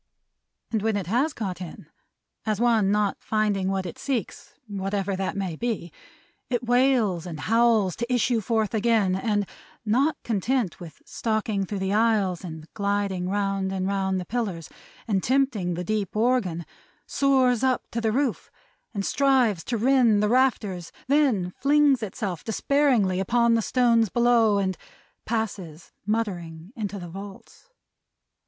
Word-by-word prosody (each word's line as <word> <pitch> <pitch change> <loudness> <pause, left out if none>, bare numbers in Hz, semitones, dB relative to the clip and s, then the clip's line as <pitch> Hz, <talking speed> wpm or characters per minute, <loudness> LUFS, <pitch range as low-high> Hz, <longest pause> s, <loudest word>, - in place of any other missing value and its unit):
And 220 -3 0
when 220 -1 0
it 195 - -3
has 250 - +1
got 190 -8 -5
in; 175 -3 -8 0.6
as 215 -2 -1
one 230 -4 +3
not 210 -1 +1
finding 210 -3 0
what 190 -1 -1
it 175 - -7
seeks, 255 -8 -4
whatever 195 -1 -2
that 190 +1 -3
may 190 -4 -2
be, 215 -4 -3 0.6
it 245 -1 -1
wails 240 -8 +2
and 160 -4 -6
howls 225 -3 +3
to 235 +2 -3
issue 245 -1 +2
forth 220 0 0
again; 220 -4 +2
and 205 +1 0 0.4
not 265 +9 +2
content 230 -1 -1
with 165 -5 -11
stalking 215 -3 -2
through 205 - -4
the 190 +1 -1
aisles, 210 -5 +2
and 160 -3 -8
gliding 200 -3 -1
round 195 -1 -1
and 190 -1 -2
round 190 -1 0
the 180 - -5
pillars, 195 -7 -3 0.4
and 200 -4 +1
tempting 235 -9 +1
the 175 - -3
deep 210 0 -2
organ, 215 -8 +1 0.4
soars 260 -3 +2
up 260 -1 +2
to 235 - -2
the 220 -1 +1
roof, 265 +1 -1 0.5
and 200 -1 -2
strives 255 -10 +2
to 240 - -1
rend 235 -3 +4
the 210 - +2
rafters; 215 -8 +1
then 255 -11 +2
flings 285 -2 +4
itself 195 -4 -4
despairingly 230 -6 +2
upon 235 +4 +2
the 230 - +3
stones 230 -2 +3
below, 235 -3 +3
and 190 -3 -1 0.5
passes, 195 -8 -4 0.2
muttering, 180 -5 -3
into 210 -3 -4
the 175 -2 -7
vaults. 195 - -11
210 Hz, 150 wpm, -25 LUFS, 190-240 Hz, 0.6 s, rend